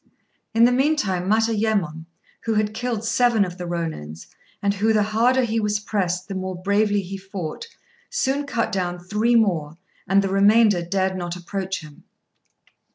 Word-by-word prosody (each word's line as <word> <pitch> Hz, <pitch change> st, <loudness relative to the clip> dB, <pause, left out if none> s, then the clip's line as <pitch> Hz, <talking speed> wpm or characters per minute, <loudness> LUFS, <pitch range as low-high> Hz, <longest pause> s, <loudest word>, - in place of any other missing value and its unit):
In 230 Hz, -, +5 dB
the 245 Hz, -, +4 dB
meantime, 250 Hz, -, +1 dB
Matayémon, 215 Hz, -7 st, +1 dB, 0.4 s
who 225 Hz, -1 st, 0 dB
had 210 Hz, 0 st, +1 dB
killed 235 Hz, -2 st, -3 dB
seven 230 Hz, -2 st, +3 dB
of 180 Hz, 0 st, -8 dB
the 180 Hz, -, -4 dB
Rônins, 160 Hz, -, -5 dB, 0.3 s
and 200 Hz, 0 st, +1 dB
who 215 Hz, +3 st, +1 dB
the 210 Hz, -1 st, +3 dB
harder 235 Hz, +5 st, +2 dB
he 225 Hz, -1 st, 0 dB
was 210 Hz, -1 st, 0 dB
pressed 185 Hz, -4 st, -2 dB
the 200 Hz, -, -5 dB
more 185 Hz, -1 st, -4 dB
bravely 205 Hz, +2 st, +2 dB
he 195 Hz, +2 st, -6 dB
fought, 190 Hz, -, -6 dB, 0.4 s
soon 280 Hz, +2 st, -1 dB
cut 230 Hz, -4 st, -1 dB
down 180 Hz, -2 st, -2 dB
three 210 Hz, +7 st, 0 dB
more, 165 Hz, -9 st, +1 dB, 0.3 s
and 195 Hz, +1 st, +4 dB
the 195 Hz, -, -1 dB
remainder 205 Hz, 0 st, +4 dB
dared 190 Hz, +2 st, -1 dB
not 175 Hz, -1 st, -4 dB
approach 190 Hz, +1 st, -4 dB
him. 150 Hz, -2 st, -14 dB
200 Hz, 160 wpm, -23 LUFS, 180-225 Hz, 0.4 s, In